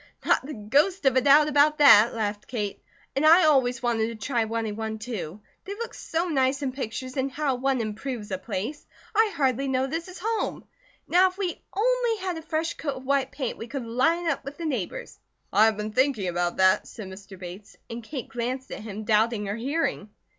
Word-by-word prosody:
"Not - - +3
the 295 +3 -7
ghost 285 - +1
of 265 -2 +4
a 260 - +5
doubt 290 +3 +6
about 300 +1 +4
that," 235 -6 +7
laughed 210 -2 -3
Kate, 210 -5 -4 0.3
"and 275 - +1
I 330 +3 +7
always 260 -5 +3
wanted 230 -2 +1
to 230 - -6
try 240 -5 +1
running 220 -1 -3
one, 220 0 -4
too. 215 -5 -6 0.2
They 400 +2 -6
look 465 +2 -6
so 330 +2 -2
nice 270 -3 +1
in 265 - -1
pictures, 255 0 -5
and 265 +1 0
how 285 -1 0
one 260 +1 0
improves 220 0 -4
a 190 - -2
place! 215 +10 -5 0.3
I 440 0 +3
hardly 270 -1 +1
know 260 0 +1
this 325 +6 -4
is 370 0 -10
home. 445 +4 -2 0.4
Now 370 +2 +5
if 370 - -16
we 375 -3 -3
only 480 +1 +2
had 370 -2 -3
a 325 - -6
fresh 320 +1 -2
coat 285 -4 -4
of 260 0 -10
white 275 0 +1
paint 265 -5 -4
we 225 - -6
could 265 -1 -5
line 325 +9 +1
up - - -1
with 280 +1 -8
the 335 - -5
neighbours." 250 - -4 0.3
"I 215 - +6
have 220 -2 +2
been 210 0 -4
thinking 255 -5 +1
about 175 0 -1
that," 185 0 +4
said 215 -4 -9
Mr. 190 +1 -11
Bates, 180 +3 -10
and 230 +1 -6
Kate 260 +2 -6
glanced 255 +2 -4
at - - -6
him, 215 0 -6
doubting 215 0 +2
her 200 +1 -3
hearing. 255 -3 -2
260 Hz, 210 wpm, -26 LUFS, 220-305 Hz, 0.4 s, that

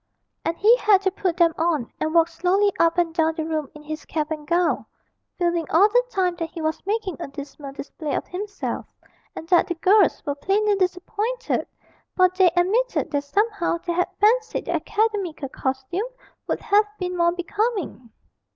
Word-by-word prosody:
And 335 - -2
he 445 +4 +6
had 410 -5 +4
to 380 - +2
put 365 -2 -2
them 335 -2 +4
on 320 -7 0
and 310 - -1
walk 330 -1 +6
slowly 370 +4 +1
up 335 +1 +3
and 340 -2 +1
down 320 -1 +1
the 320 -2 -3
room 310 -3 -2
in 300 - -12
his 310 +1 -6
cap 305 -1 -3
and 300 -1 -5
gown, 345 +1 +1 0.5
feeling 345 -3 0
all 390 +6 +5
the - - +3
time 365 -5 0
that 330 -1 -3
he 340 - -9
was 315 0 -2
making 405 -6 -1
a - - -4
dismal 280 0 -9
display 290 +2 -5
of - - -2
himself, 405 +2 -5 0.5
and 320 - -7
that 360 0 +4
the 345 - -2
girls 380 +3 +3
were 285 - 0
plainly 405 +7 +1
disappointed, 410 +6 -1 0.5
for 370 -1 +5
they 370 0 +4
admitted 430 +8 +1
that 285 -1 0
somehow 405 +2 0
they 345 - -1
had 360 +1 0
fancied 445 +2 +2
the - - -2
academical 410 -10 -1
costume 265 - -3 0.4
would - - -2
have 420 0 +3
been 360 -1 -3
more 340 -1 +3
becoming. 365 - -2
355 Hz, 180 wpm, -23 LUFS, 320-405 Hz, 0.5 s, he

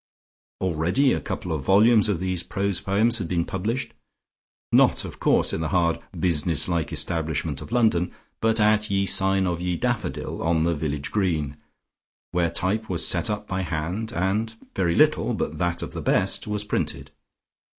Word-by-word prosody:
Already 95 - +2
a - - -2
couple 90 -5 -5
of 80 -3 -1
volumes 105 - +4
of 95 -5 0
these 90 -1 -2
prose 100 -1 -1
poems 110 +4 +2
had 90 - -3
been 85 -1 0
published, 115 +7 -3 0.8
not - - +4
of - - -9
course - - +2
in - - -2
the 80 - -1
hard 85 -3 +1 0.2
business 80 -3 +2
like 85 -3 -1
establishment 80 -3 -1
of - - -10
London, 110 -8 +2 0.3
but 115 0 +2
at 105 0 +3
"Ye 100 0 +1
Sign 95 0 +2
of 90 -1 -2
ye 90 -1 -1
Daffodil," 120 -6 -3
on 80 -1 +1
the 85 +1 +1
village 75 -2 -3
green, 80 -9 0 0.8
where 85 -1 +1
type 105 +5 -1
was 90 -3 +2
set - - +2
up 105 0 -3
by 95 0 -2
hand, 90 +6 -3
and 105 +5 -1 0.2
very 85 -3 +1
little, - - +3
but 75 0 -3
that 85 0 -1
of - - -7
the - - -5
best, - - +1
was 105 0 -1
printed. 105 - -3
95 Hz, 170 wpm, -24 LUFS, 85-105 Hz, 0.8 s, volumes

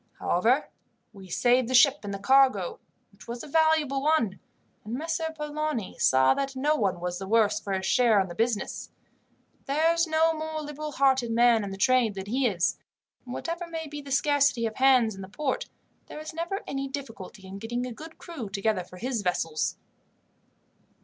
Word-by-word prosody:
However, 235 +11 +1 0.4
we 195 -2 -12
saved 245 +6 +2
the 255 - 0
ship 280 +3 +6
and 205 - -6
the 200 - -3
cargo, 255 -4 +3 0.3
which 200 - -17
was 235 0 -6
a - - -9
valuable 315 -3 +2
one, 275 -10 +1 0.4
and 220 +3 -5
Messer 320 +2 -2
Polani 300 -7 -3
saw 130 0 +4
that 275 -1 -3
no 295 +4 +1
one 195 - 0
was 180 0 -4
the 195 - -6
worse 215 -1 +3
for 200 - -6
his 190 0 -2
share 230 -1 +4
in 190 - 0
the 175 - -8
business. 225 +3 -2 0.8
There's 330 +4 +2
no 320 +1 +3
more 315 0 -4
liberal 300 +1 -6
hearted 265 -3 +2
man 235 -1 +4
in 200 - -4
the 195 - -7
trade 240 -1 +3
than 190 -1 -5
he 250 +5 +1
is, 180 -6 0 0.5
and 250 - -7
whatever 340 +1 -4
may 325 -1 -5
be 295 -1 -7
the 280 -1 -10
scarcity 280 -3 +2
of 220 -1 -4
hands 255 -4 +4
in 195 - -9
the 190 - -9
port, 265 +6 -3 0.4
there - - -8
is 310 - -7
never 340 +5 -4
any 275 0 -3
difficulty 225 -8 -8
in 190 +1 -8
getting 240 +3 -3
a 250 - -6
good 320 +6 -11
crew 290 - -7
together 195 -1 -1
for 180 +1 -14
his 240 +2 -2
vessels. 165 -4 -1
250 Hz, 190 wpm, -27 LUFS, 205-300 Hz, 0.8 s, ship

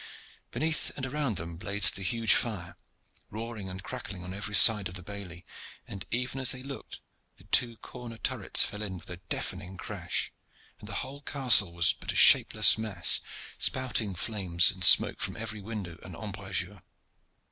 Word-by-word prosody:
Beneath 160 0 -3
and 135 - -5
around 135 - -4
them 85 0 -7
blazed 100 +2 +2
the 100 - -8
huge 115 +3 +1
fire, 90 -7 -3 0.5
roaring 110 -2 -8
and 95 +1 -9
crackling 95 -3 -9
on 90 +1 -9
every 105 +1 -5
side 105 -2 +6
of 90 - -10
the 90 - -10
bailey, 95 -3 -11 0.4
and 95 -2 -10
even 125 +3 -4
as 130 - +1
they 130 0 -11
looked 140 0 -10 0.4
the - - -20
two 115 -2 +1
corner 120 -1 -12
turrets 110 - +2
fell 105 0 -8
in 95 -3 -6
with 90 - -12
a 90 - -9
deafening 90 0 -5
crash, - - -5 0.5
and 105 - -12
the 100 - -6
whole 140 +2 -13
castle 125 -10 +4
was 85 0 +1
but - - -7
a - - -9
shapeless - - +7
mass, 100 -6 +2 0.4
spouting 120 -6 -1
flames 90 -3 +2
and 95 -1 -5
smoke - - +6
from - - -6
every 110 -1 -7
window 95 -6 -9
and 95 -3 -12
embrasure. 100 -1 -5
105 Hz, 170 wpm, -26 LUFS, 95-115 Hz, 0.5 s, shapeless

